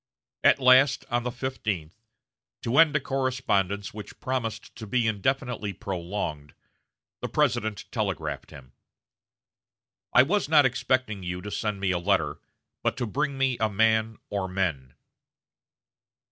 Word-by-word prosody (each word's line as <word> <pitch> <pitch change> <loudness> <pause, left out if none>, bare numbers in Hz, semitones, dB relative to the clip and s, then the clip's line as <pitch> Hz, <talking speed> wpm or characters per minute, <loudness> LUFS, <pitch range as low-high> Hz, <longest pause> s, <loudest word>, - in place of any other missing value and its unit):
At - - +6
last, 130 +2 +5
on 120 0 +2
the 125 +1 -3
fifteenth, 110 -10 -4 0.7
to 120 +4 +2
end 160 -2 +6
a - - +4
correspondence 125 -8 -1
which 105 0 -9
promised 125 -4 -3
to 110 -2 -7
be 120 +3 +1
indefinitely 110 0 -1
prolonged, 85 -7 -4 0.7
the - - -3
President 110 -2 0
telegraphed - - -3
him: 65 -2 -13 1.4
"I 125 - +7
was 185 +3 0
not 150 -3 +6
expecting 125 -4 0
you 90 0 -4
to 105 - -6
send 105 -2 -2
me 95 -1 +1
a 90 - 0
letter, 100 +2 +1 0.4
but - - 0
to 125 - -1
bring 140 +5 -2
me 135 -2 +1
a 110 -1 +2
man 110 +1 +2
or 100 -2 -1
men." 85 -9 -2
110 Hz, 135 wpm, -27 LUFS, 95-130 Hz, 1.4 s, I